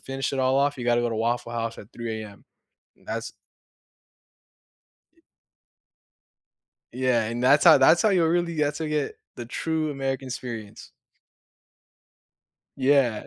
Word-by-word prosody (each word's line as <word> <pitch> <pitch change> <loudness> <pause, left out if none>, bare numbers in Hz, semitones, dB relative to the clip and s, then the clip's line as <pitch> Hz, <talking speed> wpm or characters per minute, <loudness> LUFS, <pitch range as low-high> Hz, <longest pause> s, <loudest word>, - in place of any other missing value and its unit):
finish 135 +1 -3
it 135 - -1
all 130 +1 +2
off, 140 0 +1
you 120 - -6
gotta 120 0 +2
go 120 - 0
to - - -3
Waffle 120 +1 -1
House 115 0 -4
at 105 - -13
3:00 110 -2 -5
AM. 100 -1 -14 0.6
That's - - -5 1.8
Ye - - -30 1.7
Yeah, 125 -2 +1
and 120 +2 -4
that's 140 +4 +5
how - - +8
that's 150 +6 +5
how 215 - +3
you 175 -4 +3
really 170 0 0
that's 150 0 0
how 160 - -3
you 150 - -4
get 150 - 0
to 145 - 0
get - - -18 0.2
the 120 - -7
true 160 +4 -2
American 135 -1 -3
experience. 115 -4 -8 1.8
Yeah. 130 -5 +2
130 Hz, 155 wpm, -25 LUFS, 120-145 Hz, 1.8 s, how